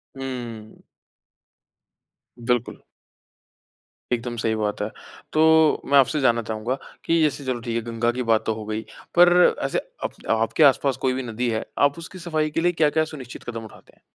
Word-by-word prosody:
हुँ। 120 Hz, -5 st, -7 dB, 1.6 s
बिल्कुल। 120 Hz, 0 st, -1 dB, 1.4 s
एकदम 120 Hz, 0 st, -2 dB
सही 110 Hz, -1 st, 0 dB
बात 105 Hz, -1 st, -2 dB
है। 105 Hz, -, -1 dB, 0.4 s
तो 160 Hz, 0 st, +5 dB
मैं 140 Hz, -, +4 dB
आपसे 150 Hz, +3 st, +3 dB
जानना 120 Hz, -2 st, +3 dB
चाहूँगा 110 Hz, +5 st, -2 dB, 0.3 s
कि 165 Hz, -1 st, +2 dB
जैसे 145 Hz, -2 st, 0 dB
चलो 125 Hz, -2 st, -1 dB
ठीक 115 Hz, -1 st, -4 dB
है 115 Hz, -, 0 dB
गंगा 115 Hz, +1 st, +1 dB
की 125 Hz, +1 st, -3 dB
बात 110 Hz, -, +2 dB
तो 110 Hz, -, 0 dB
हो 110 Hz, -1 st, -7 dB
गई, 110 Hz, +1 st, -3 dB, 0.3 s
पर 175 Hz, 0 st, +6 dB
ऐसे -, -, -1 dB, 0.3 s
अप -, -, -2 dB, 0.2 s
आपके 115 Hz, +6 st, +2 dB
आसपास 135 Hz, -1 st, +4 dB
कोई 130 Hz, -, +2 dB
भी 130 Hz, 0 st, -3 dB
नदी 120 Hz, +1 st, -2 dB
है, 110 Hz, -1 st, -2 dB
आप 145 Hz, +2 st, +3 dB
उसकी 170 Hz, +3 st, -9 dB
सफ़ाई 155 Hz, -3 st, -1 dB
के 165 Hz, -, -1 dB
लिए 175 Hz, +1 st, +3 dB
क्या-क्या 160 Hz, -1 st, +2 dB
सुनिश्चित 130 Hz, -3 st, -9 dB
कदम 115 Hz, -1 st, -6 dB
उठाते -, -, -16 dB
हैं? -, -, -31 dB
125 Hz, 175 wpm, -23 LUFS, 115-155 Hz, 1.6 s, पर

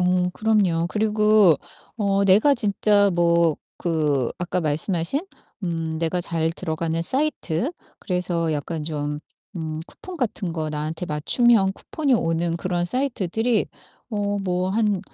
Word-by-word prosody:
어 180 Hz, 0 st, +2 dB
그럼요. 195 Hz, -7 st, +1 dB
그리고 210 Hz, -5 st, +4 dB, 0.4 s
어 200 Hz, -2 st, +1 dB
내가 210 Hz, +9 st, +5 dB
진짜 205 Hz, -3 st, +3 dB
뭐 170 Hz, -2 st, +3 dB, 0.2 s
그 150 Hz, -7 st, 0 dB
아까 180 Hz, +1 st, -1 dB
말씀하신 165 Hz, -, 0 dB, 0.4 s
음 165 Hz, -2 st, -2 dB
내가 170 Hz, +2 st, 0 dB
잘 165 Hz, -1 st, 0 dB
들어가는 165 Hz, 0 st, -2 dB
사이트 260 Hz, -, -1 dB, 0.3 s
그래서 175 Hz, -3 st, -1 dB
약간 155 Hz, +2 st, -3 dB
좀 150 Hz, -1 st, -3 dB, 0.4 s
음 155 Hz, -1 st, -4 dB
쿠폰 370 Hz, -1 st, -10 dB
같은 205 Hz, -, -2 dB
거 160 Hz, -2 st, -3 dB
나한테 155 Hz, +3 st, -4 dB
맞춤형 195 Hz, -, +3 dB
쿠폰이 285 Hz, +3 st, -2 dB
오는 165 Hz, -5 st, +1 dB
그런 175 Hz, 0 st, -1 dB
사이트들이 225 Hz, -1 st, 0 dB, 0.4 s
어 205 Hz, -2 st, -1 dB
뭐 185 Hz, -1 st, -1 dB
한 210 Hz, -2 st, +1 dB
180 Hz, 255 characters per minute, -23 LUFS, 165-210 Hz, 0.4 s, 내가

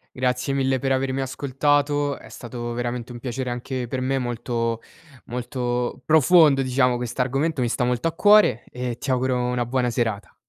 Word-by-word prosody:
Grazie 125 Hz, +1 st, 0 dB
mille 135 Hz, -1 st, +1 dB
per 135 Hz, +1 st, -2 dB
avermi 135 Hz, 0 st, 0 dB
ascoltato, 145 Hz, +2 st, 0 dB
è -, -, -14 dB
stato 120 Hz, -1 st, -6 dB
veramente 120 Hz, 0 st, -4 dB
un 120 Hz, -, -7 dB
piacere 125 Hz, +1 st, -4 dB
anche 125 Hz, 0 st, -4 dB
per 130 Hz, +2 st, -3 dB
me, 135 Hz, +1 st, 0 dB
molto, 120 Hz, -1 st, -2 dB, 0.5 s
molto 125 Hz, 0 st, -3 dB
profondo 155 Hz, -2 st, +5 dB
diciamo. 125 Hz, -1 st, +2 dB
Questo 120 Hz, +1 st, -3 dB
argomento, 135 Hz, +3 st, -1 dB
mi 120 Hz, -, +1 dB
sta 125 Hz, -, -1 dB
molto 125 Hz, +6 st, 0 dB
a -, -, -6 dB
cuore 205 Hz, -, +5 dB
e 125 Hz, -1 st, -4 dB
ti 140 Hz, -, -5 dB
auguro 130 Hz, 0 st, +1 dB
una 125 Hz, 0 st, -1 dB
buona 125 Hz, 0 st, 0 dB
serata. 110 Hz, -4 st, -2 dB
125 Hz, 170 wpm, -23 LUFS, 120-135 Hz, 0.5 s, profondo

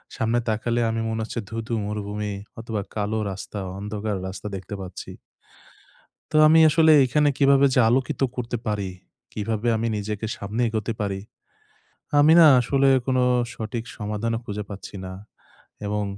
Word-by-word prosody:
সামনে 115 Hz, +2 st, +1 dB
তাকালে 115 Hz, +2 st, 0 dB
আমি 115 Hz, 0 st, -1 dB
মনে 110 Hz, 0 st, -2 dB
হচ্ছে 115 Hz, +2 st, -4 dB
ধু, 115 Hz, -, -6 dB
ধু -, -, -3 dB
মরুভূমি 105 Hz, 0 st, -4 dB, 0.3 s
অথবা 110 Hz, -2 st, -3 dB
কালো 105 Hz, +1 st, -1 dB
রাস্তা, 100 Hz, +2 st, -7 dB, 0.2 s
অন্ধকার 105 Hz, +1 st, -3 dB
রাস্তা 95 Hz, +3 st, -7 dB
দেখতে 95 Hz, +2 st, -7 dB
পাচ্ছি। 95 Hz, -1 st, -8 dB, 1.2 s
তো 155 Hz, -, -3 dB
আমি 160 Hz, +1 st, +6 dB
আসলে 160 Hz, +1 st, +5 dB
এখানে 150 Hz, +3 st, +2 dB
কিভাবে 140 Hz, 0 st, +5 dB
যে -, -, +3 dB
আলোকিত 130 Hz, +4 st, 0 dB
করতে 120 Hz, -1 st, -3 dB
পারি, 100 Hz, -2 st, -1 dB, 0.4 s
কিভাবে 110 Hz, +2 st, -2 dB
আমি 115 Hz, +1 st, -1 dB
নিজেকে 105 Hz, +1 st, -4 dB
সামনে 105 Hz, +4 st, -3 dB
এগোতে 110 Hz, +1 st, -2 dB
পারি, 100 Hz, -2 st, -2 dB, 1.0 s
আমি 150 Hz, +2 st, +6 dB
না 165 Hz, -, +9 dB
আসলে 135 Hz, +3 st, +2 dB, 0.2 s
কোন 130 Hz, -1 st, +1 dB, 0.4 s
সঠিক 110 Hz, +1 st, -5 dB
সমাধানও 110 Hz, +2 st, -2 dB
খুঁজে 105 Hz, -2 st, -5 dB
পাচ্ছি 100 Hz, +1 st, -9 dB
না 95 Hz, -, -7 dB, 0.7 s
এবং 105 Hz, 0 st, -1 dB
110 Hz, 150 wpm, -24 LUFS, 105-120 Hz, 1.2 s, না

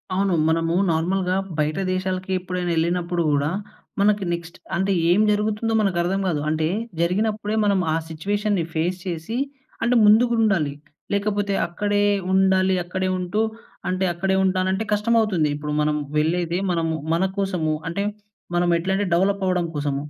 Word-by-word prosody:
అవును. 195 Hz, 0 st, +1 dB
మనము 165 Hz, +1 st, +1 dB, 0.2 s
నార్మల్‌గా 180 Hz, +3 st, +1 dB, 0.2 s
బయట 155 Hz, +3 st, 0 dB
దేశాలకి 185 Hz, 0 st, -3 dB
ఎప్పుడైనా 180 Hz, -1 st, -3 dB
ఎళ్ళినప్పుడు 170 Hz, +1 st, 0 dB
కూడా, 145 Hz, +1 st, +1 dB, 0.5 s
మనకి 205 Hz, 0 st, +3 dB
నెక్స్ట్ 170 Hz, 0 st, -6 dB, 0.2 s
అంటే 190 Hz, +2 st, +1 dB, 0.2 s
ఏం 200 Hz, -, +4 dB
జరుగుతుందో 210 Hz, +2 st, 0 dB
మనకు 195 Hz, -4 st, +1 dB
అర్థం 190 Hz, +3 st, 0 dB
కాదు. 155 Hz, -5 st, 0 dB
అంటే 155 Hz, 0 st, 0 dB, 0.3 s
జరిగినప్పుడే 210 Hz, +4 st, 0 dB
మనం 200 Hz, -2 st, +3 dB
ఆ -, -, +1 dB
సిట్యుయేషన్‌‌ని 200 Hz, +4 st, -1 dB
ఫేస్ 175 Hz, +3 st, 0 dB
చేసి, 175 Hz, +7 st, -3 dB, 0.4 s
అంటే 240 Hz, +2 st, +2 dB
ముందుకు 230 Hz, +3 st, +5 dB
ఉండాలి. 175 Hz, -10 st, +2 dB, 0.4 s
లేకపోతే 200 Hz, 0 st, 0 dB
అక్కడే 205 Hz, +4 st, 0 dB, 0.3 s
ఉండాలి. 190 Hz, 0 st, +3 dB
అక్కడే 185 Hz, +1 st, -2 dB
ఉంటూ, 180 Hz, +4 st, -1 dB, 0.5 s
అంటే 185 Hz, +1 st, 0 dB
అక్కడే 190 Hz, +3 st, 0 dB
ఉంటానంటే 190 Hz, +2 st, +1 dB
కష్టం 210 Hz, +3 st, +1 dB
అవుతుంది. 180 Hz, -9 st, +1 dB
ఇప్పుడు 150 Hz, 0 st, -4 dB
మనం 150 Hz, 0 st, +1 dB, 0.2 s
వెళ్ళేది 170 Hz, +3 st, +1 dB
మనము 165 Hz, -2 st, 0 dB, 0.2 s
మనకోసము. 185 Hz, -3 st, 0 dB
అంటే, 200 Hz, +4 st, -2 dB, 0.5 s
మనం 175 Hz, 0 st, +2 dB
ఎట్లంటే 190 Hz, +3 st, 0 dB
డెవలప్ 195 Hz, +3 st, +2 dB
అవ్వడం 180 Hz, -2 st, +1 dB
కోసం. 145 Hz, -1 st, -1 dB
185 Hz, 140 wpm, -23 LUFS, 170-200 Hz, 0.5 s, ముందుకు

